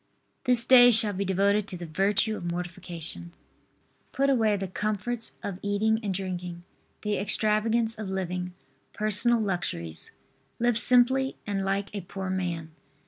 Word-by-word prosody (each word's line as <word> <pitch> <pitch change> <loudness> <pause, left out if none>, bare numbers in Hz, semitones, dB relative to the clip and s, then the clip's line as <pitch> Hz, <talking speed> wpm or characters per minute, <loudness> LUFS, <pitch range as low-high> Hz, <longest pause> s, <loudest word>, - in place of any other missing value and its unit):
This 245 -2 +5
day 245 -1 +8
shall 220 -3 +4
be 195 +1 -2
devoted 200 +2 +2
to 180 - -5
the 175 - -7
virtue 195 +6 +1
of 175 -4 -5
mortification. 170 -1 -6 0.8
Put 275 +1 +2
away 220 -5 +2
the 195 0 -4
comforts 215 +4 -2
of 190 -2 -5
eating 215 +2 +1
and 205 -3 -2
drinking, 180 -2 -5 0.4
the 210 -1 -1
extravagance 220 +2 +1
of 210 -3 -5
living, 180 -1 -3 0.4
personal 215 +3 +1
luxuries. 175 - -2 0.5
Live 240 -1 +1
simply 260 +3 +3
and 200 -2 -2
like 195 +1 -2
a 200 - -4
poor 190 +1 -5
man. 170 -4 -3
200 Hz, 140 wpm, -27 LUFS, 180-220 Hz, 0.8 s, day